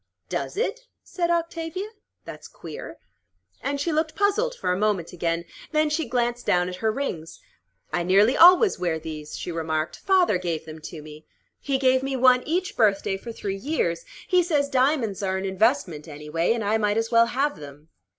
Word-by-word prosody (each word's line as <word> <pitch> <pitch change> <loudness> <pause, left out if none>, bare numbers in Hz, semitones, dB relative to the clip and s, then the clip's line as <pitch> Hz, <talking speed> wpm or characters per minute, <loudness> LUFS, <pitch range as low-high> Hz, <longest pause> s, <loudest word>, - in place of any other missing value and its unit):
"Does - - -3
it?" - - -2 0.2
said 345 -2 -2
Octavia. 335 +2 -2 0.4
"That's - - -9
queer." - - -9 0.6
And 280 0 -2
she 330 +4 -1
looked 315 0 -1
puzzled 435 +5 +1
for 180 - -2
a - - +1
moment 195 -4 -1
again. 170 0 -2 0.3
Then 305 0 +2
she 305 -5 -1
glanced 240 0 -1
down 180 0 +2
at 180 - -7
her 220 +3 0
rings. 190 - -5 0.5
"I 175 - +1
nearly 200 +7 +4
always 365 +4 +7
wear 170 -3 0
these," 155 -1 -7
she 175 - -5
remarked. 160 -1 -2
"Father 365 - +3
gave 170 -3 -3
them 160 0 -9
to 155 -3 -9
me. 155 0 -12 0.3
He 275 -1 -1
gave 260 -1 +3
me 270 0 -2
one 255 -1 +5
each 360 +4 -1
birthday 200 -3 +2
for 230 +5 -7
three 195 -3 -4
years. 195 - -1 0.2
He 365 -1 +4
says 295 -5 0
diamonds 255 -7 +1
are 190 -1 -1
an 190 - -3
investment, 190 - 0
anyway, 150 +5 -1
and 230 -2 -3
I 215 +2 +1
might 210 0 +1
as 225 0 -1
well 230 0 +5
have 280 +4 -1
them. 145 +2 -12
225 Hz, 185 wpm, -24 LUFS, -, 0.6 s, always